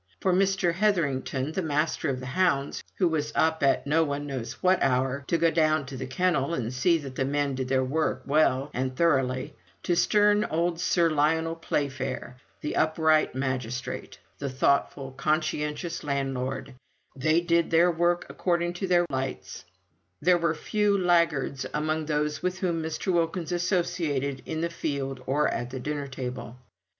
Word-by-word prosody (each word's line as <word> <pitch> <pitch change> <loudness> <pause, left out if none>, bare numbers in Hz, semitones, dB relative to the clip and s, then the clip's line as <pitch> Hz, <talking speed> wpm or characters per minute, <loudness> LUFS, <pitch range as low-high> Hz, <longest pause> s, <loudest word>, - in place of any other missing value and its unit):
From 185 0 +2
Mr. 195 -3 +2
Hetherington, 155 -8 0
the 190 - -2
Master 155 -1 0
of 130 -2 -2
the 130 - -7
Hounds, 140 -2 0
who 185 - +3
was 150 -2 -1
up 160 0 +2
at 135 -1 +2
no 155 +3 +3
one 145 -1 -3
knows 130 -5 -4
what 185 0 +2
hour, 135 +1 +1
to 170 - +2
go 165 0 +3
down 155 -2 +2
to 135 0 -8
the 130 0 -5
kennel 165 +1 +1
and 120 -2 -3
see 165 +7 +3
that 140 -4 -7
the 135 - -1
men 140 +1 0
did 130 0 -3
their 130 0 +2
work 155 +5 -1
well 140 -2 +2
and 130 +1 -2
thoroughly, 135 -6 +1 0.3
to 175 - +1
stern 210 +3 +4
old 170 +1 -1
Sir 175 -1 +3
Lionel 160 +2 +1
Playfair, 135 -5 -3 0.2
the 150 - -3
upright 155 -2 +2
magistrate, 125 -2 -3 0.2
the 140 - -3
thoughtful, 135 +1 0
conscientious 155 +3 -2
landlord 135 -1 -2 0.4
they 155 +5 +2
did 170 -1 +1
their 170 +2 +4
work 175 +1 +1
according 175 -1 -1
to 190 +2 -3
their 175 -1 +4
lights; 130 0 -4 0.5
there 175 +2 +4
were 165 -1 +1
few 205 +5 +1
laggards 170 -7 +1
among 155 +1 -1
those 150 0 -1
with 180 0 -1
whom 175 -3 -1
Mr. 160 +4 -2
Wilkins 170 0 0
associated 170 -7 -1
in 160 0 -3
the 170 - 0
field 140 -5 -3
or 145 +3 +2
at 120 - -3
the 130 +1 -6
dinner 145 +1 -3
table. 125 -2 -6
150 Hz, 165 wpm, -27 LUFS, 135-170 Hz, 0.5 s, stern